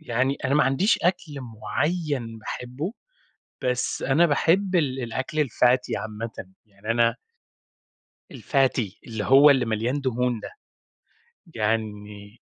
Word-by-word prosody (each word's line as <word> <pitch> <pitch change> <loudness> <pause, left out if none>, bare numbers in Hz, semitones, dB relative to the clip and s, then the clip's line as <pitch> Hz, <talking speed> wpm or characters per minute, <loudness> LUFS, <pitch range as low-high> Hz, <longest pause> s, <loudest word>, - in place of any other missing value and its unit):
يعني 130 -1 0
أنا 130 - +2
ما 150 - +4
عنديش 135 - +2
أكل 170 -5 -1
مُعيّن 125 +2 -3
باحبه، 125 - -5 0.7
بس 125 0 -1
أنا 145 +6 +4
باحب 180 +5 +2
ال 135 -6 +1
الأكل 130 +6 -1
الFatty 125 +1 +2
عامةً، 110 +1 -6 0.3
يعني 105 +1 -5
أنا 115 0 +3 1.2
الFatty 130 -7 0
اللي 110 -3 -4
هو 140 +3 +7
اللي 135 -3 +3
مليان 115 +5 -1
دهون 125 -3 -1
ده، - - -7 1.1
يعني 105 -1 -3
125 Hz, 115 wpm, -25 LUFS, 115-145 Hz, 1.2 s, هو